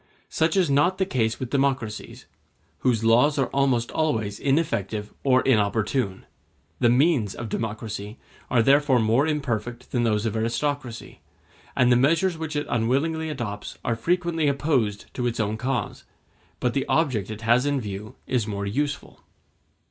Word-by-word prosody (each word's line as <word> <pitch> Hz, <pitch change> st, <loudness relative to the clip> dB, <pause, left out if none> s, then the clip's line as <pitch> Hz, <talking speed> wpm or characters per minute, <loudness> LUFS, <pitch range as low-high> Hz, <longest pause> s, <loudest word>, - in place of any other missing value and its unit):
Such 160 Hz, +4 st, +1 dB
is 185 Hz, -3 st, +4 dB
not 150 Hz, +7 st, +3 dB
the 190 Hz, -, +1 dB
case 115 Hz, -9 st, -1 dB
with 130 Hz, -2 st, -5 dB
democracies, 135 Hz, -6 st, -1 dB, 0.5 s
whose 120 Hz, -4 st, +1 dB
laws 125 Hz, +6 st, +4 dB
are 135 Hz, -3 st, 0 dB
almost 130 Hz, -4 st, +1 dB
always 110 Hz, -10 st, -1 dB
ineffective 110 Hz, -, -1 dB
or 130 Hz, -2 st, +4 dB
inopportune. 110 Hz, -2 st, +1 dB, 0.5 s
The 120 Hz, -, +4 dB
means 125 Hz, -, +2 dB
of 115 Hz, -2 st, -6 dB
democracy 110 Hz, -1 st, -4 dB, 0.3 s
are 120 Hz, -3 st, +3 dB
therefore 140 Hz, 0 st, +4 dB
more 115 Hz, +6 st, +3 dB
imperfect 125 Hz, -5 st, -3 dB
than 120 Hz, -, +1 dB
those 110 Hz, -2 st, +1 dB
of 110 Hz, -1 st, -1 dB
aristocracy, 120 Hz, +2 st, -3 dB, 0.6 s
and 125 Hz, -1 st, +4 dB
the -, -, +6 dB
measures 165 Hz, +7 st, +2 dB
which 160 Hz, -1 st, -5 dB
it 145 Hz, -, -1 dB
unwittingly 140 Hz, +8 st, 0 dB
adopts 115 Hz, -8 st, -5 dB
are 120 Hz, -, +1 dB
frequently 170 Hz, +4 st, 0 dB
opposed 135 Hz, -8 st, 0 dB
to 125 Hz, -1 st, -1 dB
its 120 Hz, -1 st, -3 dB
own 110 Hz, 0 st, 0 dB
cause; 125 Hz, +2 st, -3 dB, 0.6 s
but 125 Hz, -1 st, 0 dB
the 135 Hz, -, -1 dB
object 130 Hz, -, +1 dB
it 110 Hz, 0 st, -6 dB
has 120 Hz, +4 st, +3 dB
in 145 Hz, -1 st, +1 dB
view 105 Hz, -1 st, -7 dB
is 120 Hz, -4 st, 0 dB
more 100 Hz, -1 st, -3 dB
useful. 140 Hz, +7 st, -3 dB
125 Hz, 155 wpm, -25 LUFS, 110-145 Hz, 0.6 s, the